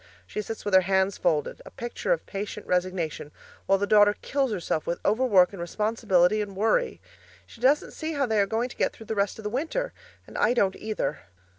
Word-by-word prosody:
She 210 - -4
sits 225 +1 -7
with 205 - -2
her 190 - +8
hands 190 +1 +1
folded, 160 -5 0
a - - -11
picture 240 - -4
of - - +1
patient 205 +1 -5
resignation, 180 -5 -2 0.4
while 195 - +4
the 200 - 0
daughter 205 0 +5
kills 275 -3 0
herself 170 -5 -2
with 170 - -1
overwork 205 -5 +4
and 190 - -7
responsibility 210 0 +2
and 200 -2 -5
worry; 225 - +1 0.5
she 235 - -16
doesn't 275 +4 +3
see 320 0 -4
how 285 -2 +1
they 220 -3 +1
are 200 - +3
going 225 +4 -1
to - - -11
get - - 0
through 225 - -12
the 220 - -3
rest 200 -1 0
of 220 - -9
the 210 - -2
winter 330 - -2 0.3
and - - -7
I 245 - +3
don't 195 -5 +2
either. 215 0 -3
210 Hz, 210 wpm, -26 LUFS, 190-235 Hz, 0.5 s, her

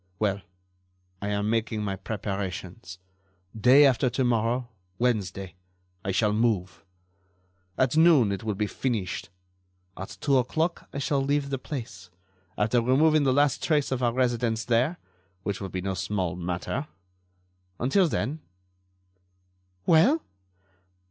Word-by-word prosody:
Well, 100 -1 0 0.8
I 100 - -3
am 105 +1 0
making 110 -1 -1
my 100 -2 -2
preparations. 95 -2 -5 0.6
Day 125 +6 +6
after 130 -1 +3
to 130 +2 -1
morrow, 120 +1 +1 0.3
Wednesday, 100 -7 -1 0.5
I 95 - -1
shall 105 +2 +2
move. 105 -4 0 0.9
At 130 +2 +2
noon 155 -10 +5
it 100 0 -4
will 110 -2 -2
be 105 +2 0
finished. 105 -6 -3 0.7
At 95 - -8
two 140 -3 +3
o'clock 160 +7 -1
I - - -6
shall 140 0 0
leave 140 0 0
the 135 - -1
place, 110 - -7 0.5
after 110 +4 +2
removing 145 +5 +3
the 130 - +4
last 145 0 +2
trace 150 -4 +1
of 130 -1 -1
our 120 -1 +2
residence 120 -3 0
there, 125 +8 +1 0.5
which 100 -1 -3
will 95 - -4
be 95 - -4
no 95 +1 -2
small 95 -2 -2
matter. 90 - -3 0.9
Until 170 +10 +3
then——" 155 0 -2 1.5
"Well?" 225 - +4
115 Hz, 130 wpm, -27 LUFS, 100-135 Hz, 1.5 s, Day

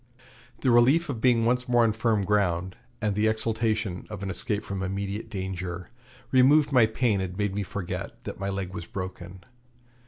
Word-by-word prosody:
The 130 - +3
relief 135 +9 +4
of 120 -6 -3
being 120 -3 +4
once 125 +1 +1
more 120 -1 +5
on 110 -2 +3
firm 110 -2 +1
ground, 95 -3 +1 0.3
and 105 -1 +1
the 105 +2 +2
exultation 110 -3 0
of 105 -2 -6
an 95 - -2
escape 100 +3 -2
from 100 -1 -4
immediate 100 +3 -3
danger, 95 -2 -5 0.4
removed 140 +3 +5
my 125 -4 +5
pain 110 -3 +1
and 90 -1 -5
made 105 -2 0
me 105 - -1
forget 95 -2 -5
that - - -7
my 100 0 -2
leg 95 -1 -4
was 85 - -6
broken. 95 -1 -7
105 Hz, 180 wpm, -27 LUFS, 95-115 Hz, 0.4 s, more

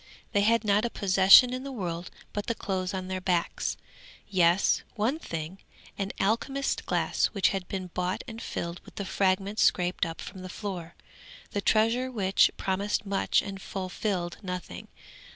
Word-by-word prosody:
They 205 - +3
had 230 +2 +3
not 210 0 +3
a 235 - 0
possession 195 +5 +6
in 255 - -3
the 275 +1 -6
world 175 -7 -4 0.2
but 205 - -3
the 230 - 0
clothes 185 -3 -2
on 185 -1 -4
their 185 0 -3
backs; 180 -2 0 0.5
yes, 180 -1 +3
one 240 +8 0
thing 165 - -6 0.4
an 195 0 -3
alchemist's 265 +7 0
glass - - +1
which 200 -3 +3
had 190 -3 -3
been 190 -2 -4
bought 180 +1 -2
and 230 0 -7
filled 170 +1 -4
with - - -16
the 200 - -4
fragments 195 +2 +1
scraped 180 +1 +2
up 165 - -7
from 190 - -8
the 185 - -7
floor. 180 -4 -6 0.6
The 205 - -1
treasure 225 +5 +2
which 195 -6 +3
promised 200 +2 -1
much 195 0 +1
and 195 -1 -7
fulfilled 185 -2 -3
nothing. 180 - -6
195 Hz, 165 wpm, -28 LUFS, 185-215 Hz, 0.6 s, possession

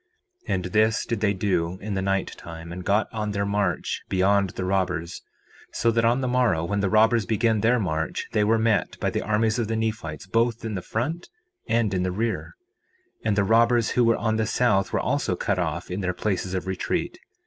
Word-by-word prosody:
4:25 - - 0
And 90 -1 -3
this 110 +4 +2
did 115 -3 -2
they 105 -1 +2
do 90 -3 0
in 105 0 -4
the 95 - -1
night 95 0 -1
time, 85 0 -9
and 90 +1 -6
got 105 +3 +2
on 105 -2 -2
their 100 0 0
march 100 0 -1
beyond 95 +1 +2
the 95 +1 -5
robbers, 90 -3 -1 0.5
so 115 - +2
that 115 0 +1
on 120 +3 +3
the 130 - -1
morrow, 125 -10 +2
when 100 +4 -1
the 100 -1 +1
robbers 110 +1 +3
began 110 -1 +1
their 120 +2 +3
march, 80 -7 -2
they 105 - +2
were 110 +2 +3
met 110 -4 +1
by - - 0
the - - -1
armies 110 +2 +1
of 115 - 0
the 115 - -1
Nephites 110 -9 -3
both 115 +3 0
in 110 - -3
their 95 - -3
front 145 - -3 0.4
and 115 -3 +2
in 90 - 0
their 90 0 0
rear. 110 +4 -3 0.6
4:26 - - -43
And 105 -2 +2
the 100 - +4
robbers 115 +2 +3
who 125 - +3
were 115 -1 +3
on 110 0 0
the 110 -1 0
south 105 -5 +2
were - - +1
also - - 0
cut 100 -2 -1
off 85 +1 -3
in 95 +3 -3
their 90 -1 -1
places 95 -2 -2
of 95 - -2
retreat. 95 -1 -2
105 Hz, 220 wpm, -25 LUFS, 95-115 Hz, 0.6 s, the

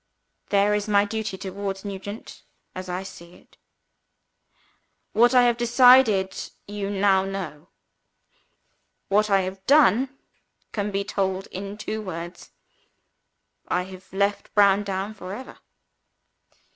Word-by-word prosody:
"There 200 +1 +3
is 210 0 -1
my 205 -1 +4
duty 220 -2 -4
towards 195 +1 -5
Nugent 200 +2 -7 0.3
as 185 0 -7
I 180 +1 -3
see 175 -2 -12
it. - - -23 1.6
"What 240 +4 +4
I 250 - +7
have 240 -1 +3
decided 240 -5 +5 0.3
on 205 - -8
you 200 -1 -3
now 195 -1 +3
know. 185 -5 -6 1.4
What 210 +2 +3
I 195 -1 +4
have 190 +1 -6
done 270 -2 +4 0.5
can 205 -1 -2
be 200 0 -1
told 190 -1 -2
in 200 +2 -6
two 215 0 -4
words. 175 -3 -7 1.2
I 180 - 0
have 190 0 -12
left 200 +2 -1
Browndown 200 0 +2
for 190 -2 -7
ever. 260 - -10
200 Hz, 120 wpm, -24 LUFS, 190-215 Hz, 1.6 s, I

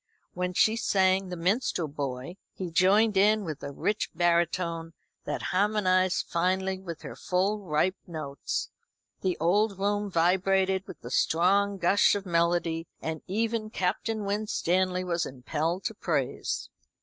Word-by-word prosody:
When 180 0 -2
she 220 +4 +3
sang 190 -3 +2
"The 180 - -5
Minstrel 180 -1 0
Boy," 140 +3 -5 0.2
he 180 -3 -5
joined 205 +5 +4
in 210 +2 +4
with 155 -4 -5
a 140 - -5
rich 205 +9 -1
baritone 170 -1 0 0.3
that - - -3
harmonised 185 -2 +2
finely 185 +2 0
with 170 -4 -8
her - - -7
full 195 +4 0
ripe 180 0 0
notes. 155 -5 -4 0.5
The 185 -2 0
old 200 +5 +2
room 205 +1 0
vibrated 190 +2 +2
with - - -10
the 120 - -8
strong 195 +7 +2
gush 195 +4 +4
of 200 -1 -4
melody, 170 -1 +1
and 160 -1 -4
even 220 +2 -1
Captain 210 +3 -1
Winstanley 185 -3 0
was 170 -2 -1
impelled 155 +7 -2
to 220 - -2
praise. 210 - -2
185 Hz, 135 wpm, -28 LUFS, 170-200 Hz, 0.5 s, joined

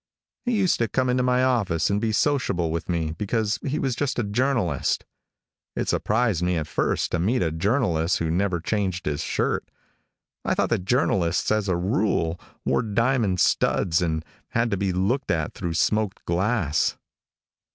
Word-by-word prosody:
He 245 - +1
used 190 -3 +2
to 115 - +2
come 130 +1 +1
into 125 0 +2
my 125 0 +2
office 100 - +1
and 100 +1 +1
be 115 -1 0
sociable 105 - +1
with 85 +2 -4
me 80 -3 0
because 105 +5 -1
he 140 +2 -1
was 135 -5 -1 0.2
a 120 - +1
journalist. 115 -2 0 0.7
It - - -2
surprised 110 -5 +1
me 90 0 +1
at 80 - -2
first 80 - -1
to 85 - 0
meet 100 +5 +1
a 80 - 0
journalist 90 - +1
who 80 -1 -1
never 90 0 0
changed 95 0 -2
his 75 -1 -1
shirt. - - -1 0.7
I - - 0
thought - - +1
that 90 - 0
journalists, 95 -8 +1
as 105 -2 +1
a 90 - +2
rule, 90 -3 0 0.3
wore - - +2
diamond 115 -3 +1
studs 85 0 +2
and 80 -2 -1 0.2
had 115 0 0
to - - +2
be 100 0 0
looked 100 +10 0
at 80 -3 0
through 85 -2 -4
smoked 105 +3 0
glass. 90 -3 +1
100 Hz, 170 wpm, -24 LUFS, 85-120 Hz, 0.7 s, used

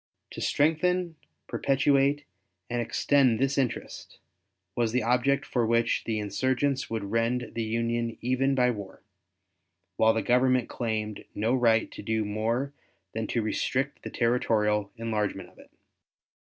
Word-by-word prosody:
To - - -7
strengthen, 170 +3 +1 0.3
perpetuate, 140 +1 +2 0.5
and 120 0 0
extend 125 +1 +2
this 135 +2 +1
interest, 130 -4 -3 0.6
was 115 -2 0
the 125 - +1
object 125 +4 +2
for 120 - 0
which 115 +1 +1
the 110 -1 -1
insurgents 130 +6 0
would 105 -3 -4
rend 115 +2 0
the 115 - -2
Union 115 +1 -1
even 130 +2 +1
by 125 -1 +3
war, 100 -4 -8 0.9
while 110 0 +4
the 110 - 0
Government 125 0 +3
claimed 110 -3 -3
no 110 +4 +1
right 115 -3 +3
to - - -8
do 110 0 -1
more 115 +7 -1 0.4
than 110 -1 -3
to 115 - -1
restrict 130 +5 -1
the - - -6
territorial 105 -4 +1
enlargement 105 -4 -2
of - - -22
it. - - -16
120 Hz, 140 wpm, -27 LUFS, 110-130 Hz, 0.9 s, while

